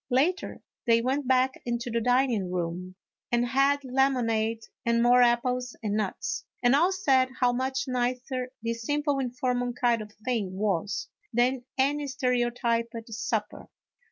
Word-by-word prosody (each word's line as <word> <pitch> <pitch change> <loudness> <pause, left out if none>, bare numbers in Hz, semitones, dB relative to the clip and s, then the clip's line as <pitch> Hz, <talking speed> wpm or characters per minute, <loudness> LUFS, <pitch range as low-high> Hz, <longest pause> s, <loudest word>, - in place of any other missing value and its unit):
Later 300 +9 0 0.2
they 230 0 +5
went 260 +3 -1
back 260 0 +2
into 240 0 -3
the 230 0 0
dining 245 -5 +2
room, 180 +1 -3 0.4
and 240 0 +2
had 275 +3 +2
lemonade 235 -4 +1 0.2
and 235 0 +2
more 245 +1 +6
apples 245 +1 +1
and 210 -2 -1
nuts, 210 -3 -2 0.2
and 245 +2 +5
all 345 +6 +4
said 270 -9 +3
how 245 -1 +3
much 265 +2 -1
nicer 255 0 -2
this 230 0 -2
simple, 290 +2 0
informal 250 -1 -1
kind 240 -2 +1
of 210 0 -9
thing 215 -7 -1
was, 190 -2 -1 0.2
than 245 +2 +1
any 285 +2 +1
stereotyped 240 -3 0 0.2
supper. 220 -1 -3
245 Hz, 140 wpm, -27 LUFS, 230-265 Hz, 0.4 s, more